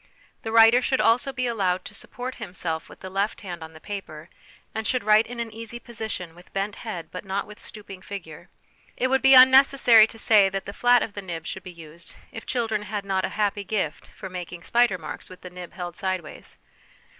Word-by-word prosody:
The 225 - -5
writer 225 +2 +7
should 260 +1 0
also 245 +4 +3
be 255 -1 -2
allowed 190 -6 0
to - - -9
support 250 +5 -6
himself 175 -5 -4
with - - -15
the 185 - -7
left 200 +3 -1
hand 175 -5 -7
on 160 0 -10
the 160 - -13
paper, 165 -6 -8 0.4
and 220 -1 -3
should 255 -3 0
write 215 +2 +5
in 240 +1 -8
an 230 -1 -4
easy 230 +1 -7
position, 220 -8 -6
with 175 +1 -18
bent 200 +2 -2
head 195 -8 -6
but 180 - -7
not 195 0 -2
with 210 0 -13
stooping 200 -3 -11
figure. 180 -6 -9 0.5
It 255 - +1
would 265 0 +2
be 270 0 +7
unnecessary 260 -3 +7
to 225 - -11
say 215 -4 +5
that 195 0 -4
the 200 - -7
flat 245 +2 +4
of 210 - -6
the 205 - -6
nib 170 -4 -6
should 190 - -5
be 180 - -10
used 165 -1 -12 0.2
if 225 - -9
children 225 -4 -1
had 205 -1 -5
not 190 -1 0
a - - -3
happy 205 -1 0
gift 210 0 -3
for 190 - -7
making 180 -2 -7
spider 235 -5 +2
marks 155 -3 -8
with 185 0 -13
the 180 - -10
nib 180 -1 -9
held 175 -2 -6
sideways. 185 -5 -5
205 Hz, 215 wpm, -25 LUFS, 180-230 Hz, 0.5 s, writer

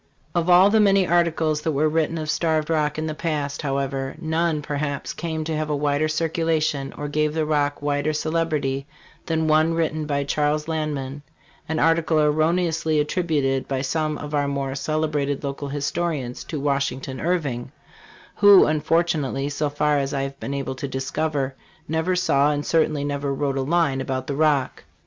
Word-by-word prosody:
Of 175 0 0
all 185 +3 +7
the 220 - +4
many 195 -2 +4
articles 165 -3 +1
that 160 0 -1
were 150 +3 +2
written 160 +1 0
of 155 -1 -2
Starved 160 -1 0
Rock 150 -2 +1
in 155 - -2
the 155 - -2
past, 150 -3 -2
however, 135 -2 -2
none, 160 -1 0
perhaps, 145 0 -3
came 160 -2 -3
to 160 0 -2
have 155 0 -2
a 150 - +1
wider 145 +1 +1
circulation, 155 -3 0
or 145 - -4
gave 150 +1 0
the 160 -1 +1
Rock 145 -1 0
wider 145 +1 0
celebrity, 155 -3 -1 0.4
than 160 -1 0
one 155 +1 +3
written 155 -2 -1
by 140 -1 0
Charles 150 +2 0
Lanman, 145 -3 -3 0.5
an 160 - -1
article 165 0 +2
erroneously 160 +1 +2
attributed 150 -4 0
by 135 -1 -2
some 155 +1 -1
of 145 +1 -7
our 145 -1 +1
more 140 -1 -2
celebrated 150 -1 -1
local 140 0 -4
historians 145 -2 -2
to 155 - -4
Washington 135 -2 -2
Irving, 150 -9 -1 0.7
who 205 -2 +8
unfortunately, 155 -3 0
so 145 +1 -1
far 145 0 +1
as 140 +1 -2
I 135 - 0
have 135 0 -6
been 140 - -4
able 135 -1 -3
to 130 +2 -5
discover, 135 +1 -2 0.3
never 160 +4 0
saw 145 -6 +3
and 145 0 -2
certainly 155 -3 +1
never 140 -1 -2
wrote 140 0 -1
a 135 - 0
line 145 -2 +1
about 130 -1 -3
the 140 - -3
Rock. 150 -2 +1
150 Hz, 170 wpm, -23 LUFS, 140-160 Hz, 0.7 s, who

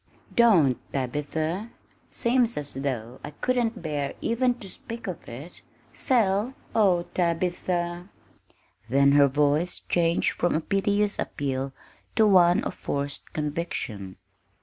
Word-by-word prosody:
"Don't, 175 - +5
Tabitha! 155 - -2 0.4
Seems 240 -1 +1
as 145 -1 -4
though 130 -3 -4
I - - -5
couldn't 230 +5 -1
bear 145 -3 -2
even 245 +2 +1
to 220 -5 -10
speak 230 +4 -8
of 185 -5 -6
it. 135 +9 -9 0.3
Sell? 225 -1 +1 0.2
oh, 190 -6 +3
Tabitha!" 175 +1 -1 0.8
Then 140 +2 +5
her 145 0 +6
voice 145 +5 +1
changed 170 -1 +1
from 175 - 0
a - - +2
piteous 205 +3 +1
appeal 135 -1 -2 0.4
to 220 - +5
one 180 -4 +5
of - - -3
forced 140 0 -4
conviction. 145 - -4
170 Hz, 120 wpm, -26 LUFS, 140-205 Hz, 0.8 s, her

